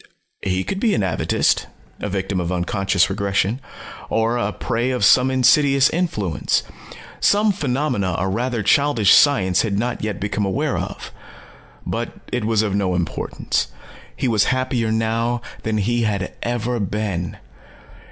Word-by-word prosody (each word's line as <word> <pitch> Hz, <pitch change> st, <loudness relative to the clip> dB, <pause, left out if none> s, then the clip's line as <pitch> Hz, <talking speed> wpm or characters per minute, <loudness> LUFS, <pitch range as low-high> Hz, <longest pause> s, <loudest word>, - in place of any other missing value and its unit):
He 95 Hz, -1 st, -1 dB
could 195 Hz, -, -3 dB
be 220 Hz, 0 st, +2 dB
an 105 Hz, -, 0 dB
atavist, 90 Hz, -5 st, +1 dB, 0.3 s
a 105 Hz, -, -3 dB
victim 95 Hz, 0 st, -2 dB
of 85 Hz, 0 st, -2 dB
unconscious 95 Hz, +1 st, +1 dB
regression. 100 Hz, +4 st, -1 dB, 0.5 s
Or 115 Hz, +1 st, +1 dB
a 105 Hz, -4 st, -1 dB
prey 120 Hz, +2 st, -2 dB
of 125 Hz, -6 st, +1 dB
some 125 Hz, +5 st, +5 dB
insidious 135 Hz, +1 st, +4 dB
influence, 110 Hz, -, 0 dB, 0.6 s
some 210 Hz, +1 st, +3 dB
phenomena 125 Hz, -, -1 dB
a 95 Hz, -, -1 dB
rather 115 Hz, +3 st, -1 dB
childish 120 Hz, -3 st, +4 dB
science 95 Hz, -11 st, +4 dB
had 100 Hz, -3 st, -1 dB
not 120 Hz, +2 st, -2 dB
yet 105 Hz, -3 st, -3 dB
become 105 Hz, +1 st, -2 dB
aware 95 Hz, -1 st, -1 dB
of. -, -, -5 dB, 0.7 s
But -, -, -3 dB, 0.2 s
it 125 Hz, -3 st, -1 dB
was 110 Hz, -1 st, +2 dB
of 105 Hz, -3 st, -1 dB
no 95 Hz, -3 st, 0 dB
importance. 85 Hz, -7 st, -2 dB, 0.5 s
He -, -, -1 dB
was 110 Hz, -4 st, +3 dB
happier 125 Hz, -3 st, 0 dB
now 115 Hz, +2 st, 0 dB, 0.2 s
than 110 Hz, -1 st, -1 dB
he 120 Hz, +4 st, 0 dB
had 100 Hz, -5 st, -1 dB
ever 120 Hz, 0 st, -2 dB
been. 100 Hz, -4 st, -3 dB
110 Hz, 145 wpm, -21 LUFS, 95-125 Hz, 0.7 s, some